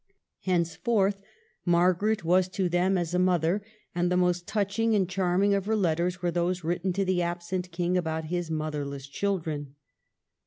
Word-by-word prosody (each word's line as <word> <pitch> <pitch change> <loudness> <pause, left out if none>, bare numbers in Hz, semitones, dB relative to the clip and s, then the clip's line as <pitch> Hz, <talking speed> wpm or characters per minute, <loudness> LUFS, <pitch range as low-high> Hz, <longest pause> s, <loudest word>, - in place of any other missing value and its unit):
Henceforth 195 +3 +1 0.4
Margaret 180 +4 +2
was 180 +2 +3
to 185 0 -1
them 180 +2 +2
as 175 -1 -2
a 180 - +2
mother; 180 +1 +2 0.3
and 175 +1 0
the 180 - +3
most 180 -1 +1
touching 215 +2 +1
and 195 -3 +2
charming 185 +2 +2
of 200 0 0
her 220 - +2
letters 175 -2 +1
are 175 - +1
those 175 +1 -1
written 175 +3 -1
to 195 +2 0
the 185 -1 +1
absent 175 +1 -3
King 175 +1 0
about 160 -2 -2
his 175 +1 -2
motherless 150 -3 -3
children. 155 -5 -3
180 Hz, 160 wpm, -28 LUFS, 170-190 Hz, 0.4 s, was